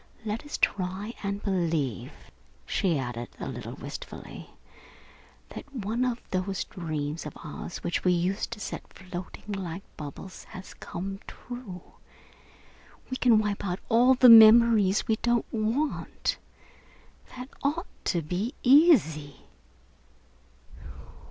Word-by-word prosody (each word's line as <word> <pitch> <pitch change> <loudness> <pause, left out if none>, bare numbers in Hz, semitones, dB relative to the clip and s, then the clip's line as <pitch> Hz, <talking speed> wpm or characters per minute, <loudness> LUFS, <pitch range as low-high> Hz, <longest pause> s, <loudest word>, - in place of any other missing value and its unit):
Let 215 +5 -3
us 295 - -5
try 195 +4 -1
and 200 0 -3
believe," 165 - -1 0.5
she 175 -5 +1
added, 120 -2 -4
a - - -4
little - - -6
wistfully, - - -9 1.0
"that 285 - -10
one 235 -1 -2
of 245 -1 -1
those 185 +1 -1
dreams 155 -3 -4
of 150 - -10
ours 165 +2 -7
which 175 - -1
we 180 - +4
used 180 +3 0
to 220 - -9
set - - -6
floating 185 +2 -8
like 190 -2 -5
bubbles, 150 +6 -9
has 185 - -10
come 195 +3 -6
true. 240 -8 -9 1.3
We 255 - -1
can 240 -4 +5
wipe 210 -2 -1
out 180 -2 -2
all 245 +3 +5
the 255 0 +6
memories 220 -3 +8
we 220 - +2
don't 240 0 +1
want. 230 +7 -1 1.0
That 250 +1 -7
ought 310 +6 0 0.2
to 170 -3 0
be 190 - -3
easy." 250 - +4
195 Hz, 120 wpm, -27 LUFS, 175-235 Hz, 1.3 s, memories